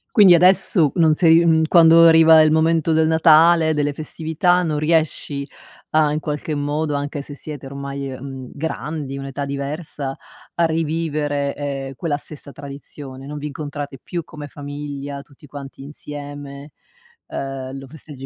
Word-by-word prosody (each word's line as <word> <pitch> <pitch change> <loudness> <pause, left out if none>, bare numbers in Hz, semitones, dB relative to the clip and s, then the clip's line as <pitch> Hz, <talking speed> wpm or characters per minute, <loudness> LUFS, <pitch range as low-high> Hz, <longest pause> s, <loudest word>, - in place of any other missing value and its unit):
Quindi 200 -5 +8
adesso 175 -3 +4
non 160 -3 +4
sei 165 +1 +4
mhmm, 160 -1 +4
quando 165 0 +7
arriva 160 -1 +7
il 155 0 +4
momento 160 0 +2
del 160 0 +3
Natale, 160 0 +5
delle 145 -1 0
festività 160 +4 0
non 155 -3 -1
riesci 155 -3 -1 0.4
a 155 -1 +3
in 150 - -1
qualche 150 0 -4
modo, 145 +1 -2
anche 145 0 -4
se 145 +1 -10
siete 145 -2 -9
ormai, 140 0 -6
ehm, 130 -1 -8
grandi, 150 -1 -5
un'età 135 +1 -5
diversa, 140 0 -5 0.4
a 170 - +2
rivivere, 155 -3 -1
ehm, 135 -2 -5
quella 150 0 -2
stessa 145 -1 -11
tradizione? 140 -1 -10
Non 150 +1 -6
vi 145 - -6
incontrate 145 -2 -7
più 175 -1 -5
come 150 -1 -10
famiglia, 145 -1 -7
tutti 140 +1 -19
quanti 140 -1 -10
insieme, 145 0 -9 0.6
ehm, 135 -1 -6
lo 135 0 -10
festeggi 140 -2 -11
145 Hz, 150 wpm, -20 LUFS, 140-160 Hz, 0.6 s, Quindi